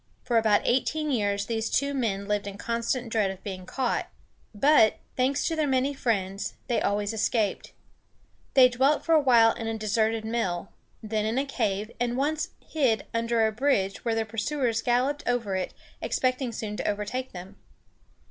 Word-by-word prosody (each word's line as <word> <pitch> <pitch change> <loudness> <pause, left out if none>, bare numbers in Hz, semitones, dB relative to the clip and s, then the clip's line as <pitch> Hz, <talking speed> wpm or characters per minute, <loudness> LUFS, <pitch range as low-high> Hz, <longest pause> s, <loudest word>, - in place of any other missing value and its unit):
For 240 -2 +3
about 215 -2 +3
eighteen 300 +4 +1
years 205 -4 0
these 225 0 -2
two 280 +1 +1
men 205 -7 -1
lived 205 0 -1
in 200 0 -6
constant 235 +2 -2
dread 215 -3 +1
of 190 0 -8
being 185 -3 -6
caught; 260 -3 -1 0.4
but, 225 0 +4 0.2
thanks 265 +2 +1
to 330 - -1
their 310 -2 +1
many 265 +1 +1
friends, 200 -7 -2
they 240 - 0
always 205 +1 0
escaped. 220 -1 0 0.8
They 260 -2 +9
dwelt 265 +4 +1
for 330 - +3
a 315 - +6
while 235 -4 +5
in 225 - -5
a 225 0 -2
deserted 220 +1 0
mill, 200 -6 -2 0.3
then 215 0 -1
in 225 +3 -1
a 275 - +1
cave, 215 -5 -2
and 245 0 0
once 310 +3 0 0.2
hid 255 -9 +1
under 230 0 +2
a 220 - +1
bridge 215 -5 0
while 230 -2 0
their 225 0 0
pursuers 230 +1 -1
galloped 255 +5 +1
over 235 -6 0
it, 185 - -2 0.3
expecting 255 -1 0
soon 215 -2 -5
to - - -3
overtake 210 +6 -3
them. 180 +1 -10
230 Hz, 175 wpm, -27 LUFS, 210-260 Hz, 0.8 s, They